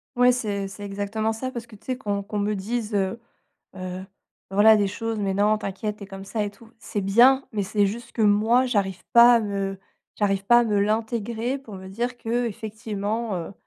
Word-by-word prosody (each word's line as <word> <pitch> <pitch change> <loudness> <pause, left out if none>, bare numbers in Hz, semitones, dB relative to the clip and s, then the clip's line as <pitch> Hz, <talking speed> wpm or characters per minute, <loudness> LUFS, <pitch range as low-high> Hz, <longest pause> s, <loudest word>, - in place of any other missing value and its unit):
Ouais, 250 0 +5
c'est 205 -5 -2
c'est 205 +1 -8
exactement 205 +2 -2
ça 255 +4 -4
parce 235 -1 -7
que 220 - -13
tu 200 - -20
sais 255 -1 -1
qu'on 205 -5 -2
qu'on 210 +1 -4
me 205 +1 0
dise, 215 +2 -3
heu 195 +3 0 0.6
heu, 185 0 -6 0.5
voilà, 210 +3 +6
des 205 -1 +1
choses: 225 +3 -3
«Mais 195 -1 0
non, 210 +2 +3
t'inquiète, 210 +1 -4
tu - - -11
es - - -11
comme 195 0 -9
ça 215 +2 -2
et 205 - -3
tout». 215 +3 -18
C'est 205 - -3
bien 245 +8 +5
mais 210 -2 -1
c'est 205 +1 +1
juste 230 +4 -5
que 225 - -2
moi, 220 +5 +4
j'arrive 195 -6 -1
pas 240 +1 +8
à - - +2
me 195 -2 -3 0.4
j'arrive 195 -2 0
pas 240 +4 +6
à - - +2
me 210 -3 +1
l'intégrer 225 +4 -1
pour 235 -6 -11
me 190 0 -10
dire 240 +6 -3
qu'effectivement, 220 -2 -3
heu, 170 +2 -5
210 Hz, 210 wpm, -24 LUFS, 200-230 Hz, 0.6 s, pas